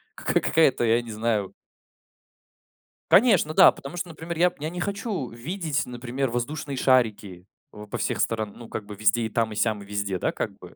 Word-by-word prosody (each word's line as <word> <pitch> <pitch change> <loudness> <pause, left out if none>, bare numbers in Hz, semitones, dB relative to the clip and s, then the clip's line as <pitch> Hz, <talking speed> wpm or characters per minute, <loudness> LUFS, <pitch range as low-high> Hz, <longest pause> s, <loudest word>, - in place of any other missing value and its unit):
кака - - 0
какая-то, 155 -6 +3
я 115 +1 +3
не 120 -1 -9
знаю. 110 -2 -1 1.6
Конечно, 190 -8 +5
да, 190 - +8
потому 140 +5 -9
что, 175 0 -4
например, 165 +1 -6
я 180 +2 +4
п - - -25
я 155 +2 -3
не 180 +2 -6
хочу 200 - -3
видеть, 155 +5 -3
например, 125 +2 -3
воздушные 135 +4 -3
шарики 110 -8 +1 0.2
в 105 0 -11
по - - -4
всех - - -2
сторон, 110 -3 -1
ну, 120 -1 -11
как 105 - -5
бы 105 - -9
везде, 110 +3 +2
и 110 - -2
там, 115 0 0
и - - -6
сям, 110 0 0
везде, 100 -2 -3
да, - - 0
как - - -3
бы - - -13
120 Hz, 195 wpm, -25 LUFS, 110-160 Hz, 1.6 s, да